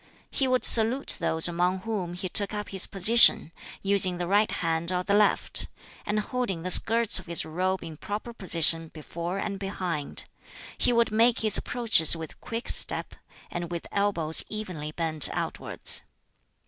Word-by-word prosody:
He 270 - -2
would 255 0 0
salute 235 +4 +4
those 160 +1 +4
among 180 +2 -2
whom 190 -5 -6
he 185 +1 -6
took 205 +3 +1
up 210 -1 -7
his 190 -1 -4
position, 200 -3 +4 0.3
using 195 -2 +1
the 175 - -4
right 205 +4 +1
hand 165 +1 -3
or 180 0 -3
the 200 - -2
left, 210 0 +1 0.4
and 210 +1 -2
holding 210 -6 -5
the 185 - -4
skirts 225 +1 +4
of 185 - -14
his 170 -1 -1
robe 185 +4 -4
in 160 -2 -11
proper 210 +7 -8
position 165 -5 +3
before 170 +4 -8
and 195 0 -6
behind. 180 -6 -6 0.5
He - - -1
would 235 -1 0
make 230 +2 +1
his 215 -2 +7
approaches 220 -11 +3
with 160 -2 -11
quick 230 +1 -7
step, - - 0 0.4
and 175 -1 -6
with 170 -1 -7
elbows 185 -6 0
evenly 180 -8 -7
bent 155 -2 +4
outwards. - - -3
190 Hz, 160 wpm, -25 LUFS, 170-215 Hz, 0.5 s, his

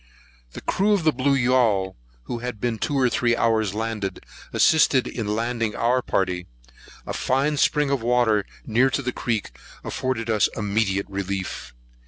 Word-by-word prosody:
The - - -8
crew 205 +2 +1
of 195 -5 +1
the 155 - +4
blue 135 +1 +1
yaul, 120 -7 +2 0.3
who 120 - -5
had 125 -2 -5
been 115 -1 -2
two 145 - -1
or 130 -2 +4
three 120 0 +1
hours 110 -4 +1
landed, 110 -4 -3 0.3
assisted 140 -5 +4
in 115 -4 -4
landing 115 -1 -1
our 125 +2 +2
party. 90 -5 -1 0.6
A - - -4
fine 140 +4 +1
spring 145 0 +2
of 140 -3 0
water 115 -4 +2 0.2
near 120 +4 +3
to 140 +1 -2
the 125 - -1
creek 115 - -2 0.3
afforded 130 -3 -3
us 110 -2 +2
immediate 100 -2 0
relief. 95 -9 -4
115 Hz, 160 wpm, -23 LUFS, 105-130 Hz, 0.6 s, the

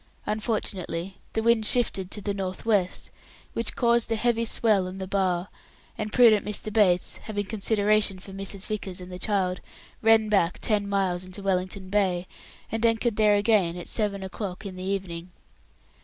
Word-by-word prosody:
Unfortunately 195 -4 -2
the 220 - 0
wind 230 -1 +4
shifted 210 -5 +1
to 210 - -6
the 200 0 -2
north 190 0 -4
west, 200 -5 0 0.4
which 230 -1 0
caused 235 -1 +2
a - - +3
heavy 230 +1 +1
swell 215 -4 +2
on 185 +1 -7
the 190 - -4
bar, 185 -2 0 0.5
and 215 -1 -4
prudent 225 -4 +6
Mr. 210 0 -4
Bates, 185 -5 +3
having 205 -2 -4
consideration 210 -1 +1
for 195 +1 -11
Mrs. 195 0 -5
Vickers 200 -4 -4
and 180 0 -9
the 180 - -7
child, 185 -3 0 0.4
ran 225 -1 +5
back 195 -5 +2
ten 205 -2 0
miles 190 -3 0
into 185 +2 -7
Wellington 185 0 -1
Bay, 185 -3 +1 0.5
and 225 0 -2
anchored 230 0 +2
there 210 -1 +4
again 205 -5 +2
at 175 - -7
seven 200 -3 -2
o'clock 190 0 -5
in 190 -2 -6
the 190 +2 -1
morning. 175 -2 -8
200 Hz, 170 wpm, -26 LUFS, 185-215 Hz, 0.5 s, prudent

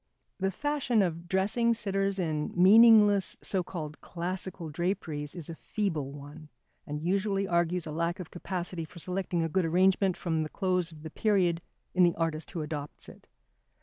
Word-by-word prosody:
The 190 - +1
fashion 250 -1 +1
of 170 -1 -3
dressing 210 +6 +2
sitters 195 -2 -1
in 155 -5 -1
meaningless, 205 0 +6
so 190 - +1
called 155 -4 -7
classical 180 0 -4
draperies 155 -3 -3
is 170 -4 -6
a 165 - -5
feeble 160 -6 -3
one, 145 +2 -11 0.4
and 150 +1 -4
usually 195 +2 0
argues 170 0 +1
a 155 - -5
lack 170 +3 -1
of 180 - -8
capacity 175 -1 -4
for 160 - -12
selecting 180 0 -2
a - - 0
good 185 +3 +1
arrangement 185 +2 +3
from 160 -3 -1
the 155 - -3
clothes 180 -2 -1
of 155 -1 -13
the 160 - -7
period 180 -5 +1 0.3
in 185 - +2
the 175 -1 +5
artist 165 -1 -2
who 165 -4 -4
adopts 150 -1 -6
it. - - -16
175 Hz, 170 wpm, -29 LUFS, 160-195 Hz, 0.4 s, meaningless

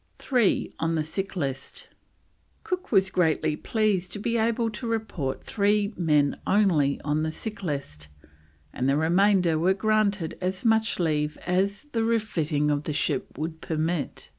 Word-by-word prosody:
THREE 245 -7 +1
ON 165 0 0
THE 155 - 0
SICK 195 +6 -4
LIST. 135 -6 -4 0.8
Cook 365 +1 -4
was 190 -3 +3
greatly 160 -4 +1
pleased 205 -2 0
to - - -4
be 230 +3 -1
able 230 0 +1
to 235 +3 -6
report 195 -12 -3
three 205 0 +1
men 150 -5 +2
only 170 -9 +3
on 150 +1 0
the 160 0 -1
sick 210 +5 -6
list, 140 - -5 0.7
and 130 +2 0
the 140 - +3
remainder 175 0 +3
were 185 +4 +3
granted 205 -4 0
as 185 +3 -2
much 220 -1 +2
leave 150 -3 0
as 195 +3 0
the 225 -1 0
refitting 165 -10 0
of 145 0 -1
the 155 - -2
ship 145 - -1
would 160 +2 -4
permit. 160 -1 -2
180 Hz, 155 wpm, -26 LUFS, 155-215 Hz, 0.8 s, was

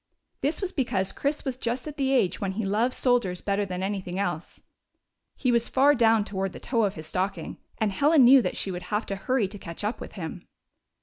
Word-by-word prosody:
This 295 +8 -1
was 375 - -1
because 195 -8 0
Chris 290 +2 -2
was 260 -2 -2
just 245 +4 -2
at 300 - -6
the 270 -1 +1
age 245 -9 +2
when 195 -2 -1
he 215 +1 -2
loved 220 +6 +1
soldiers 240 -8 +1
better 200 0 -1
than 185 0 -4
anything 190 -2 -3
else. 175 -4 -3 0.8
He 255 - +1
was 235 -1 +2
far 280 +2 +4
down 225 -4 +3
toward 195 -2 -3
the - - -8
toe 230 -3 +1
of 200 - -2
his 155 - -8
stocking, 185 +5 -3 0.2
and 215 -2 +1
Helen 285 +7 +4
knew 260 +2 +8
that - - -3
she 195 - -2
would 180 0 -7
have 210 +2 0
to 195 - -3
hurry 220 +2 0
to 205 +1 -9
catch 170 +2 -8
up 210 +4 -2
with - - -8
him. - - -7
210 Hz, 225 wpm, -26 LUFS, 190-255 Hz, 0.8 s, knew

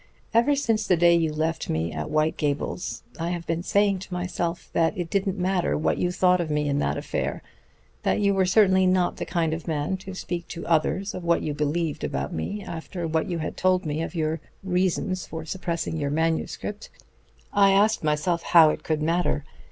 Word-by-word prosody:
Ever 240 +6 +4
since 225 -7 0
the 180 - +4
day 170 +1 +5
you 165 -2 +1
left 160 +2 -2
me 80 +1 -1
at 75 0 -4
White 155 +1 +1
Gables 145 +4 -2 0.2
I 165 +1 -1
have 175 -1 -3
been 165 0 -1
saying 200 +1 +2
to 190 - -10
myself 175 -1 -3
that 165 +4 +2
it 175 -2 -4
didn't 195 -1 0
matter 185 0 +1
what 155 - 0
you 180 - +1
thought 180 0 +3
of 165 - -3
me 150 0 0
in 140 0 +1
that - - 0
affair; - - -3 0.6
that - - +1
you 200 -1 +3
were 190 -1 +2
certainly 190 -2 +5
not 185 -1 +2
the - - -4
kind 165 -3 0
of 160 +1 -5
man 155 +3 -1
to 190 0 -9
speak 175 -2 -4
to 170 - -7
others 170 +4 +1
of 180 - -6
what 170 0 +2
you 150 - -2
believed 150 - -1
about 70 -1 -2
me, 200 - -4
after 170 +1 -5
what 160 +3 0
you 175 - -1
had 155 - -4
told 185 0 +2
me 150 +1 -2
of 165 - -5
your 160 0 -1 0.2
reasons 185 0 0
for 160 -1 -6
suppressing 170 -1 -3
your 145 -2 -1
manuscript. 165 +7 -2 0.6
I 200 -1 +5
asked 205 +1 +3
myself 155 +3 +1
how 165 -3 +6
it - - -6
could 155 -1 -1
matter. 165 -3 0
170 Hz, 205 wpm, -25 LUFS, 155-185 Hz, 0.6 s, how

